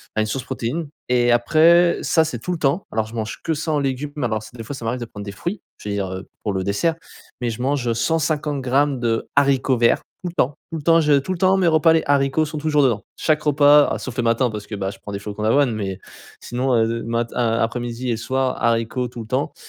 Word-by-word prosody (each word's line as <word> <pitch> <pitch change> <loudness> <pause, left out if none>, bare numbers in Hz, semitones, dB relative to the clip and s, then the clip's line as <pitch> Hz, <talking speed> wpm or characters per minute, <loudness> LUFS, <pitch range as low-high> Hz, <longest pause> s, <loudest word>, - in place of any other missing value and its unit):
enfin 110 - +2
une - - +1
source 130 +4 -3
protéine 140 +6 -3 0.2
et 120 -1 +3
après 165 +8 +4
ça 160 -1 +3
c'est 150 -7 -4
tout 180 - -4
le 175 - -1
temps. 145 +7 +1
Alors 110 -1 -1
je 115 - -11
mange 110 -1 -4
que 165 - 0
sans 155 0 -1
légumes 140 +1 -2
mais 145 - -1
alors 110 -2 -2
c - - -11
des 115 - -6
fois 130 +6 -6
ça 125 - -9
m'arrive 120 +3 -1
de - - -3
prendre 105 -2 -9
des 100 - -5
fruits, 175 - -4 0.2
je - - -9
veux 100 - -2
dire, 95 -2 -2
heu, 95 +1 -7 0.2
pour 105 - -1
le 95 -1 -1
dessert, 105 - 0 0.5
mais 120 - 0
je 115 - -6
mange, 135 -1 0
heu, 115 - +2
150 150 +2 0
grammes 135 +1 +1
de 115 -2 -1
haricots 135 -2 +3
verts, 115 0 +3 0.2
tout 180 - -2
le - - -11
temps, 140 -3 +1 0.2
tout 165 - -3
le - - -6
temps 165 +1 +5
je 150 -2 +4
tout 140 - -5
le - - -5
temps 185 +2 +4
mes 185 -2 +2
repas, 160 0 +5
les 160 - +2
haricots 140 +2 +2
sont 155 0 -6
toujours 150 -1 +2
dedans. 115 -6 +1
Chaque 155 -1 +1
repas 145 0 +6
ah - - -2
sauf 125 -2 -7
le 120 - +1
matin 115 +2 +2
parce 105 -1 -7
que, 105 - -5
bah, 95 -1 -2
je 100 - -13
prends 105 - -8
des 100 - -3
flocons 105 +1 -6
d'avoine, 125 +4 +3
mais, 100 -3 -4 0.4
sinon, 125 +1 -1
heu, 115 0 +1
mat 115 0 -2
a 115 -2 +1
après-midi 120 +2 -3
et 115 - -1
soir, 130 +3 -1
haricots 115 +2 +1
tout 120 0 -8
le 110 - -9
temps, 130 +5 -1
125 Hz, 265 wpm, -21 LUFS, 115-150 Hz, 0.5 s, repas